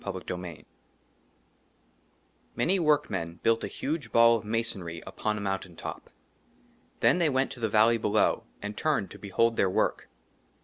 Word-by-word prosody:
31 95 Hz, -2 st, -5 dB, 0.2 s
XXXI 85 Hz, -3 st, -9 dB, 1.9 s
MANY 190 Hz, +3 st, +2 dB
WORKMEN 105 Hz, -, 0 dB
BUILT 115 Hz, 0 st, +2 dB
A -, -, -1 dB
HUGE 145 Hz, -5 st, -4 dB
BALL 115 Hz, 0 st, +6 dB
OF 110 Hz, -, -8 dB
MASONRY 105 Hz, -7 st, -2 dB
UPON 105 Hz, 0 st, -2 dB
A -, -, -4 dB
MOUNTAIN 95 Hz, -3 st, -3 dB
TOP. -, -, -7 dB, 0.9 s
THEN -, -, +4 dB
THEY 165 Hz, -3 st, +3 dB
WENT 130 Hz, -1 st, +1 dB
TO 125 Hz, -, -8 dB
THE 110 Hz, -2 st, 0 dB
VALLEY 110 Hz, +2 st, +4 dB
BELOW, 105 Hz, 0 st, +2 dB, 0.2 s
AND 105 Hz, 0 st, -4 dB
TURNED 150 Hz, -9 st, 0 dB
TO -, -, -11 dB
BEHOLD 115 Hz, +3 st, +1 dB
THEIR 95 Hz, -, +3 dB
WORK. -, -, 0 dB
110 Hz, 150 wpm, -28 LUFS, 95-120 Hz, 1.9 s, BALL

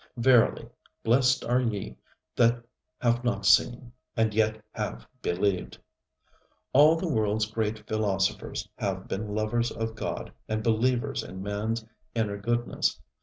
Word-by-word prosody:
Verily, 120 Hz, -1 st, +4 dB, 0.4 s
blessed 125 Hz, +2 st, +3 dB
are 125 Hz, +2 st, +2 dB
ye 110 Hz, -5 st, -3 dB, 0.4 s
that 120 Hz, 0 st, +3 dB, 0.4 s
have 120 Hz, 0 st, +2 dB
not 105 Hz, -5 st, -1 dB
seen, 120 Hz, +4 st, +4 dB, 0.3 s
and 110 Hz, -1 st, +2 dB
yet 110 Hz, 0 st, +2 dB
have -, -, -4 dB, 0.2 s
believed. 90 Hz, +1 st, -1 dB, 1.0 s
All 150 Hz, +4 st, +7 dB
the 165 Hz, -, -3 dB
worldŌĆÖs 110 Hz, -6 st, 0 dB
great 110 Hz, -1 st, -2 dB
philosophers 100 Hz, -3 st, -1 dB
have 95 Hz, -1 st, -2 dB
been 105 Hz, +1 st, -3 dB
lovers 115 Hz, +2 st, 0 dB
of 115 Hz, 0 st, -3 dB
God 110 Hz, -, -5 dB, 0.2 s
and 110 Hz, 0 st, -1 dB
believers 125 Hz, +4 st, +1 dB
in 95 Hz, 0 st, -8 dB
manŌĆÖs 110 Hz, +3 st, -2 dB, 0.3 s
inner 105 Hz, -3 st, 0 dB
goodness. 120 Hz, +3 st, 0 dB
110 Hz, 125 wpm, -28 LUFS, 105-120 Hz, 1.0 s, All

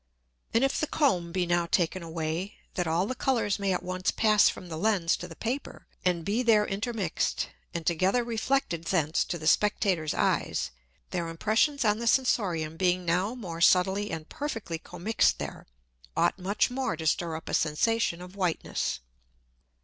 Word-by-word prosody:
And 230 Hz, -, +3 dB
if 270 Hz, -, +1 dB
the 310 Hz, -, 0 dB
Comb 185 Hz, -, +1 dB
be 180 Hz, 0 st, 0 dB
now 175 Hz, 0 st, +1 dB
taken 175 Hz, +2 st, +1 dB
away, 165 Hz, +3 st, -3 dB, 0.2 s
that 180 Hz, -3 st, -1 dB
all 165 Hz, +3 st, +1 dB
the 255 Hz, -, -2 dB
Colours 235 Hz, -6 st, 0 dB
may 200 Hz, -1 st, 0 dB
at 180 Hz, -, -1 dB
once 185 Hz, 0 st, -1 dB
pass 215 Hz, -2 st, +4 dB
from 180 Hz, -, -7 dB
the 165 Hz, -, -6 dB
Lens 190 Hz, -3 st, +2 dB
to 175 Hz, -, -7 dB
the 165 Hz, -, -11 dB
Paper, 250 Hz, -, -4 dB, 0.2 s
and 175 Hz, -3 st, 0 dB
be 215 Hz, +5 st, +1 dB
there 220 Hz, -4 st, +4 dB
intermixed, 205 Hz, -3 st, -2 dB, 0.2 s
and 170 Hz, -1 st, -5 dB
together 185 Hz, +9 st, +2 dB
reflected 230 Hz, -7 st, -1 dB
thence 160 Hz, -4 st, +1 dB
to 175 Hz, -, -3 dB
the 155 Hz, -, -8 dB
Spectator's 185 Hz, -3 st, +2 dB
Eyes; 60 Hz, +1 st, 0 dB, 0.4 s
their 175 Hz, -2 st, -2 dB
Impressions 225 Hz, -, +1 dB
on 210 Hz, 0 st, +3 dB
the 235 Hz, -, -2 dB
Sensorium 180 Hz, -11 st, +1 dB
being 180 Hz, 0 st, +1 dB
now 185 Hz, +7 st, +1 dB
more 175 Hz, -9 st, -6 dB
subtilly 190 Hz, +4 st, +4 dB
and 160 Hz, -1 st, -5 dB
perfectly 225 Hz, -, -4 dB
commixed 180 Hz, +8 st, +1 dB
there, -, -, -7 dB, 0.5 s
ought -, -, +2 dB
much 200 Hz, +6 st, +1 dB
more 255 Hz, -9 st, -1 dB
to 160 Hz, -, -6 dB
stir 165 Hz, +1 st, +1 dB
up 160 Hz, -, -8 dB
a -, -, -4 dB
Sensation 175 Hz, +3 st, +1 dB
of 180 Hz, +2 st, -12 dB
Whiteness. 180 Hz, -, -1 dB
185 Hz, 170 wpm, -28 LUFS, 170-220 Hz, 0.5 s, pass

